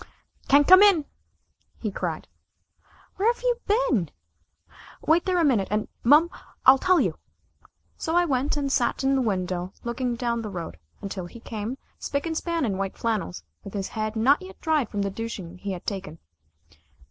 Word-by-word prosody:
"Can't 285 +1 +5
come 370 +1 +9
in!" 390 -8 +5 0.7
he 215 - -3
cried. - - -4 0.9
"Where've 465 +6 +1
you - - +2
been?" 405 - +2 1.0
"Wait 330 +2 +3
there 370 -1 +1
a 340 - +3
minute 235 -10 +2
and 210 +1 -1 0.2
mum. 300 +8 +5 0.3
I'll 265 +1 +8
tell 370 +2 +4
you." - - 0 0.8
So 325 - -2
I 350 0 +4
went 280 -1 0
and 280 -1 -1
sat 250 0 +1
in 270 +1 +3
the 265 - +2
window 185 -4 -2
looking 240 +1 -2
down 235 -1 -1
the 215 - -5
road, 175 -4 -6 0.2
until 190 -3 -5
he 235 - -12
came, 225 +2 -5 0.2
spick 280 +2 -2
and 325 -1 -2
span 335 -2 -1
in 195 -4 -2
white 195 -1 -3
flannels, 210 - -2 0.2
with 200 - -9
his 195 -1 -3
head 215 0 -3
not 265 +9 +4
yet 375 +1 -11
dried 310 -7 +1
from 205 -1 -2
the 200 - -2
douching 190 -5 -6
he 200 0 -4
had 180 - -8
taken. 190 -5 -5
235 Hz, 175 wpm, -25 LUFS, 200-315 Hz, 1.0 s, come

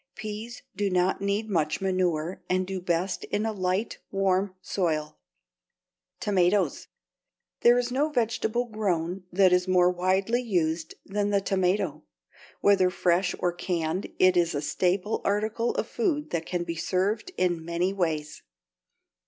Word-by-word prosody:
Peas 220 +2 -7
do 200 +1 0
not 185 +1 +1
need 200 +2 0
much 160 -7 0
manure 185 -2 -1
and 185 0 +1
do 190 0 -4
best 175 +2 -1
in 210 +2 -1
a 220 - 0
light, 190 +2 -1
warm 195 0 +1
soil. 160 -5 -2 1.0
=Tomatoes.= 195 0 +1 0.7
There 240 +1 +6
is 245 0 0
no 285 +5 +1
vegetable 240 -2 0
grown 185 -5 -2
that 185 0 +4
is 180 +1 +2
more 180 -1 +4
widely 190 +6 +1
used 165 -7 -1
than 205 +1 -1
the 200 -1 +3
tomato. 190 -3 0 0.6
Whether 190 -2 +4
fresh 180 0 +1
or 175 - 0
canned 175 0 -2
it 185 0 +5
is 170 -2 +2
a 145 - -1
staple 185 +6 0
article 215 +3 0
of - - 0
food 300 -7 -1
that 165 -1 -2
can 175 -1 -1
be 170 -1 -4
served 190 - -1
in 175 -3 +1
many 170 +3 -1
ways. 160 -5 -2
185 Hz, 145 wpm, -27 LUFS, 175-205 Hz, 1.0 s, There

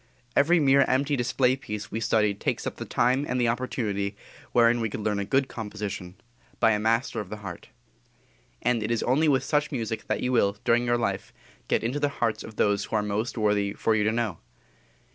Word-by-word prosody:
Every 165 +5 +4
mere 140 -2 +5
empty 140 +2 +1
display 125 0 +2
piece 105 -5 -7
we 110 - -2
study 105 -1 +2
takes 100 - -2
up - - -4
the - - -5
time 130 +3 +2
and 125 - 0
the 120 - +2
opportunity 105 -5 -2 0.3
wherein 120 0 +4
we 115 - 0
could 105 - -5
learn 105 -1 0
a 100 - -2
good 135 +5 +2
composition, 105 -6 -6 0.4
by 115 - +5
a 105 - +1
master 115 +3 +1
of 105 -3 -6
the 105 - -6
heart. 90 -3 -8 0.9
And 120 -2 +2
it 105 - -2
is 115 -1 0
only 145 +6 +2
with 135 -3 +3
such 150 0 0
music 115 -4 -3
that - - -1
you 125 - 0
will, 100 -5 +2
during 120 +1 +3
your 120 0 +3
life, 100 -5 -2 0.4
get - - +1
into 125 +6 -1
the 145 0 +1
hearts 115 -2 0
of 110 - -10
those 100 -1 +1
who - - -4
are 105 - +2
most 105 +4 -2
worthy 105 -2 +1
for 110 - +1
you 110 -1 +2
to 110 - +2
know. 110 -6 -2
115 Hz, 215 wpm, -26 LUFS, 105-125 Hz, 0.9 s, mere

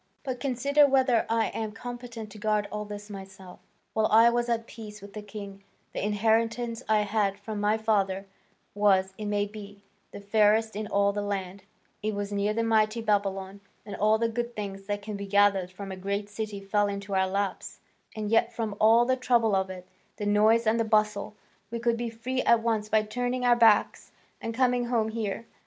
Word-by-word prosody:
But 260 -3 -4
consider 280 +3 +3
whether 260 -3 +2
I 225 0 +1
am 220 -1 -4
competent 240 -2 -8
to 215 - -11
guard 210 -1 0
all 210 0 -4
this 205 0 -8
myself. 190 -2 -11 0.3
While 220 -1 +2
I 230 +2 +6
was 240 0 0
at 230 -1 0
peace 215 -2 -10
with 200 0 -12
the 210 - -6
king, 200 -1 -9 0.3
the - - -3
inheritance 225 +3 0
I 215 -1 +4
had 205 -1 0
from 205 0 -5
my 210 +1 +2
father 200 -3 0 0.5
was, 190 -2 +3
it 210 - -4
may 205 0 +1
be, 205 -1 -11 0.3
the - - -9
fairest 215 +1 +2
in 210 0 -3
all 200 0 +2
the 205 - -2
land: 195 -1 -4 0.4
it 215 0 -2
was 205 0 -4
near 205 +1 0
that 230 +2 0
mighty 220 0 +2
Babylon, 200 -2 -1 0.2
and 205 -2 -6
all 215 +2 +3
the 230 +1 +1
good 235 +1 -4
things 195 -2 -6
that 205 -1 -3
can 210 -1 -5
be 200 0 -6
gathered 200 -2 +3
from 195 +1 -8
a - - -5
great 200 +2 -3
city 210 -1 -5
fell 205 +1 +1
into 200 0 -5
our 190 0 +2
laps, 195 0 -3 0.4
and 215 -1 -3
yet 230 +1 +3
from 225 -3 -3
all 225 +2 +6
the 260 +1 +2
trouble 240 -4 +2
of 190 0 0
it, 180 -1 -9 0.3
the 210 - -4
noise 215 +3 +4
and 220 +1 +2
the - - +3
bustle, 215 -1 0 0.3
we 235 - -4
could 235 0 +1
be 235 0 -3
free 245 +3 -3
at 235 -1 +4
once 220 -2 0
by 215 0 +3
turning 245 +3 -2
our 240 -1 +5
backs 225 -3 +3 0.3
and 230 0 -4
coming 250 -1 +2
home 230 -2 0
here. 220 0 -3
215 Hz, 200 wpm, -27 LUFS, 200-230 Hz, 0.5 s, I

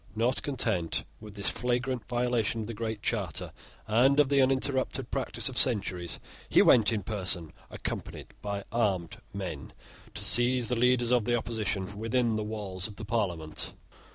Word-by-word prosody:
Not 120 +4 +1
content 110 - 0 0.2
with 105 -1 -11
this 100 -1 +1
flagrant 125 +1 -1
violation 120 -2 0
of - - -4
the 115 - -5
Great 110 -1 -4
Charter - - -1 0.3
and 125 +6 +4
of 145 -3 +5
the 140 -1 +4
uninterrupted 130 -1 0
practice 135 - 0
of 130 -1 0
centuries, 95 -8 +1 0.3
he - - +6
went 115 -3 +6
in 105 -3 -1
person, 90 -6 -1 0.2
accompanied - - -5
by 100 -1 -3
armed 100 -8 0
men, 90 -9 -5 0.4
to - - -3
seize 120 +1 +2
the 125 - +1
leaders 125 0 +3
of 120 -4 +3
the 120 - +2
opposition 105 -4 -2
within 115 0 +1
the 110 - -1
walls 105 -3 -4
of 105 - -11
Parliament. 90 -9 -2
115 Hz, 155 wpm, -29 LUFS, 100-125 Hz, 0.4 s, he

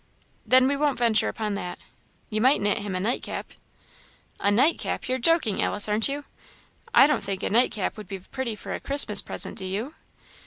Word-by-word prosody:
"Then, 255 0 +5
we 280 - +1
won't 290 -1 0
venture 235 -2 +2
upon 215 -2 -3
that. 180 -3 -5 0.5
You 215 0 -1
might 260 +4 +4
knit 205 +2 0
him 200 -2 -5
a - - -1
nightcap." 220 +7 -3 0.9
"A 200 - +2
nightcap? 260 +11 +1
you're 255 0 -1
joking, 315 - +2
Alice, 205 - 0
aren't 215 +4 +2
you? 285 +1 -4 0.7
I 465 - +7
don't 290 -7 +1
think 195 -1 -4
a - - -1
nightcap 225 -3 +1
would 210 -3 -9
be 195 - -5
pretty 230 +5 -5
for - - -7
a - - -4
Christmas 275 -8 +3
present - - -3
do 190 - -5
you?" 210 +10 -4
220 Hz, 190 wpm, -25 LUFS, 205-265 Hz, 0.9 s, I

